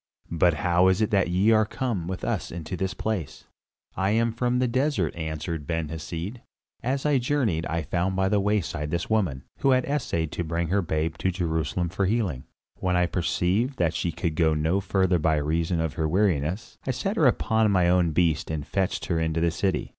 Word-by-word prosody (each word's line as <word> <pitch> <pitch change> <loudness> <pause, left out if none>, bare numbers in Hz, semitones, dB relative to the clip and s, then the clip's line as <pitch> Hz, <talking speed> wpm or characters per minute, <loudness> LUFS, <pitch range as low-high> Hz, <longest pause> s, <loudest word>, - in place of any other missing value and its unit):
But 85 0 +3
how 90 +3 +3
is 95 +1 +3
it 110 - +1
that 100 -2 +3
ye 95 +5 +3
are 110 -1 +5
come 110 - -3
with 95 0 -5
us - - -2
into 85 +1 -5
this 95 +1 -2
place?" 105 -10 -4 0.5
"I 95 +1 +1
am 115 +2 +2
from 125 +1 0
the 125 0 +2
desert," 130 - 0
answered 80 -1 -4
Ben 80 -2 -2
Hesed. 85 +8 -5 0.4
"As 135 +4 -1
I 145 -3 +3
journeyed 120 - 0
I 80 0 -2
found 90 +5 -1
by 95 0 +2
the 105 +1 +2
wayside 95 -7 -1
this 85 +6 -3
woman, 90 -12 0 0.2
who 135 - +2
had 130 -1 +3
essayed 100 - -1
to 85 - -3
bring 85 0 -2
her 100 +2 +2
babe 80 -1 -2
to 95 - +1
Jerusalem 85 -1 -1
for 95 +2 0
healing. 95 - -1 0.3
When 90 -1 0
I 90 0 +3
perceived 90 - 0
that 85 -2 +1
she 85 +1 -1
could 85 0 -2
go 80 -1 +2
no 80 +5 +1
further 95 -2 +1
by 80 0 +2
reason 80 +3 0
of 80 -4 -1
her 80 +3 -1
weariness, 90 0 0
I - - -1
set 195 - -1
her 155 - +4
upon 110 -3 +2
my 90 -3 +3
own 90 -1 +3
beast 80 0 +1
and 75 -2 -3
fetched 95 +3 -1
her 85 -2 0
into 80 0 0
the 85 0 +2
city. 95 +3 -1
90 Hz, 205 wpm, -26 LUFS, 80-105 Hz, 0.5 s, are